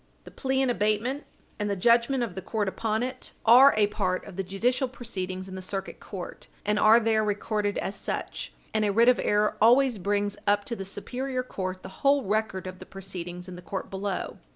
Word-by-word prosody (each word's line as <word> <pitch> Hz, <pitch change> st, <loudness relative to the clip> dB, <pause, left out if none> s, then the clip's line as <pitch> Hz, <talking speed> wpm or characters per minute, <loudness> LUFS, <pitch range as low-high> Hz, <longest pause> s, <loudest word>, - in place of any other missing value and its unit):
The -, -, -12 dB
plea 265 Hz, 0 st, 0 dB
in 255 Hz, -, +2 dB
abatement 230 Hz, +6 st, 0 dB, 0.3 s
and 210 Hz, 0 st, -1 dB
the 200 Hz, -, 0 dB
judgment 235 Hz, +5 st, +3 dB
of 225 Hz, -6 st, -4 dB
the 190 Hz, -, -6 dB
court 210 Hz, -1 st, -2 dB
upon 220 Hz, +3 st, -1 dB
it 255 Hz, 0 st, -6 dB
are 255 Hz, +5 st, +8 dB
a 210 Hz, -, +5 dB
part 190 Hz, -3 st, -1 dB
of 195 Hz, -, -10 dB
the 195 Hz, -, -1 dB
judicial 235 Hz, +8 st, 0 dB
proceedings 190 Hz, -7 st, -5 dB
in 190 Hz, -, -9 dB
the 190 Hz, -, -6 dB
Circuit 195 Hz, +1 st, -5 dB
Court 190 Hz, -4 st, -8 dB, 0.2 s
and 210 Hz, +1 st, +1 dB
are 220 Hz, +3 st, +7 dB
there 220 Hz, -1 st, +2 dB
recorded 210 Hz, 0 st, -1 dB
as 195 Hz, -, -3 dB
such, -, -, -4 dB, 0.2 s
and 215 Hz, -1 st, +2 dB
a 205 Hz, -, +2 dB
writ 230 Hz, +4 st, +5 dB
of 250 Hz, -, +4 dB
error 210 Hz, 0 st, +1 dB
always 245 Hz, 0 st, +5 dB
brings 205 Hz, +1 st, 0 dB
up 205 Hz, 0 st, +3 dB
to 235 Hz, -, -3 dB
the 195 Hz, -, -6 dB
superior 255 Hz, +6 st, -3 dB
court 185 Hz, -5 st, -5 dB
the -, -, -7 dB
whole 280 Hz, 0 st, +4 dB
record 205 Hz, -2 st, -1 dB
of 185 Hz, 0 st, -7 dB
the -, -, -10 dB
proceedings 180 Hz, -2 st, -7 dB
in 180 Hz, -, -8 dB
the 180 Hz, -, -9 dB
court 180 Hz, +3 st, -5 dB
below. 195 Hz, +1 st, -3 dB
210 Hz, 210 wpm, -27 LUFS, 190-235 Hz, 0.3 s, are